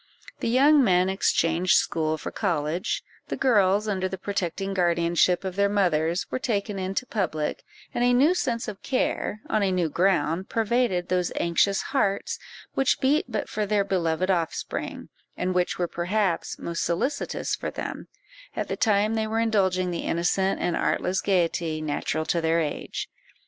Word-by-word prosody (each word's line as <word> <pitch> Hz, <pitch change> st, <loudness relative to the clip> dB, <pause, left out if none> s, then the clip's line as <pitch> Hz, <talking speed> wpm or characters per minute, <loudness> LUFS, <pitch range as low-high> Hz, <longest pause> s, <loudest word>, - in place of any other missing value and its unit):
The -, -, -1 dB
young 280 Hz, +4 st, +5 dB
men 185 Hz, -3 st, +3 dB
exchanged 175 Hz, -2 st, +2 dB
school 155 Hz, -1 st, 0 dB
for -, -, -6 dB
college; 160 Hz, +2 st, -1 dB, 0.2 s
the -, -, -3 dB
girls, 210 Hz, -4 st, +3 dB
under 190 Hz, -2 st, -1 dB
the 190 Hz, -, -5 dB
protecting 195 Hz, 0 st, -3 dB
guardianship 175 Hz, 0 st, +2 dB
of 190 Hz, -1 st, -4 dB
their 200 Hz, 0 st, +2 dB
mothers, 175 Hz, -4 st, +1 dB
were -, -, -1 dB
taken 205 Hz, -5 st, -2 dB
into 190 Hz, +6 st, -2 dB
public; 165 Hz, -10 st, -2 dB, 0.3 s
and 240 Hz, -, 0 dB
a 245 Hz, -, +4 dB
new 275 Hz, +8 st, +5 dB
sense 240 Hz, -10 st, -1 dB
of 205 Hz, -3 st, -7 dB
care, 250 Hz, -4 st, -1 dB
on 215 Hz, -, +1 dB
a 195 Hz, -1 st, +2 dB
new 180 Hz, -3 st, +1 dB
ground, 175 Hz, 0 st, +1 dB
pervaded 225 Hz, -5 st, +1 dB
those 180 Hz, -1 st, +1 dB
anxious 185 Hz, +4 st, +2 dB
hearts, 200 Hz, -8 st, 0 dB, 0.3 s
which 270 Hz, -1 st, +2 dB
beat 280 Hz, +3 st, +2 dB
but 215 Hz, -3 st, -2 dB
for 210 Hz, -1 st, -2 dB
their 205 Hz, -1 st, +2 dB
beloved 185 Hz, -1 st, 0 dB
offspring, 170 Hz, -3 st, -3 dB, 0.3 s
and 185 Hz, +1 st, -1 dB
which 180 Hz, -1 st, 0 dB
were 175 Hz, -, 0 dB
perhaps 180 Hz, +1 st, -1 dB
most 170 Hz, 0 st, -3 dB
solicitous 260 Hz, -, -1 dB
for -, -, -4 dB
them, -, -, -6 dB, 0.5 s
at -, -, -3 dB
the -, -, -1 dB
time 215 Hz, 0 st, +2 dB
they 220 Hz, -1 st, 0 dB
were 220 Hz, +1 st, -1 dB
indulging 190 Hz, -5 st, +1 dB
the 170 Hz, -, -3 dB
innocent 185 Hz, +3 st, +1 dB
and 175 Hz, -, 0 dB
artless 185 Hz, +1 st, 0 dB
gaiety 170 Hz, -4 st, 0 dB
natural 155 Hz, +1 st, -2 dB
to 170 Hz, -, 0 dB
their 165 Hz, +1 st, +2 dB
age. 155 Hz, -3 st, -3 dB
190 Hz, 165 wpm, -25 LUFS, 170-215 Hz, 0.5 s, young